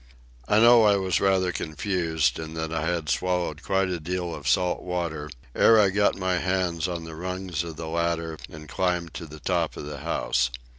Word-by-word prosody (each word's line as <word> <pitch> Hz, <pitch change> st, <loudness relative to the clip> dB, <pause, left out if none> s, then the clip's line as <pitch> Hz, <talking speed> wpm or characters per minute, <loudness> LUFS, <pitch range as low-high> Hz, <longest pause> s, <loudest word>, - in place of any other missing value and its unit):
I 105 Hz, -, +3 dB
know 120 Hz, +1 st, +7 dB
I 105 Hz, -2 st, +5 dB
was 95 Hz, -3 st, 0 dB
rather 95 Hz, -2 st, +2 dB
confused, 80 Hz, +1 st, -1 dB
and 80 Hz, 0 st, -6 dB
that 80 Hz, 0 st, -3 dB
I 80 Hz, 0 st, -1 dB
had 85 Hz, -3 st, -1 dB
swallowed 90 Hz, -2 st, -1 dB
quite 95 Hz, 0 st, +1 dB
a 90 Hz, -2 st, -2 dB
deal 90 Hz, +1 st, -3 dB
of -, -, -7 dB
salt 90 Hz, -1 st, +2 dB
water, 85 Hz, -4 st, -3 dB, 0.2 s
ere 115 Hz, -1 st, +6 dB
I 100 Hz, -2 st, +4 dB
got 100 Hz, +1 st, +2 dB
my 95 Hz, -2 st, 0 dB
hands 90 Hz, -2 st, 0 dB
on 85 Hz, -2 st, -4 dB
the 80 Hz, 0 st, -8 dB
rungs 90 Hz, -1 st, -3 dB
of 85 Hz, -2 st, -7 dB
the 80 Hz, +1 st, -6 dB
ladder 85 Hz, -1 st, -2 dB
and 75 Hz, -1 st, -11 dB
climbed 90 Hz, 0 st, -1 dB
to 85 Hz, -, -7 dB
the 75 Hz, +1 st, -11 dB
top 70 Hz, -, -1 dB
of -, -, -6 dB
the 75 Hz, -1 st, -6 dB
house. 70 Hz, -5 st, 0 dB
85 Hz, 200 wpm, -26 LUFS, 80-95 Hz, 0.2 s, know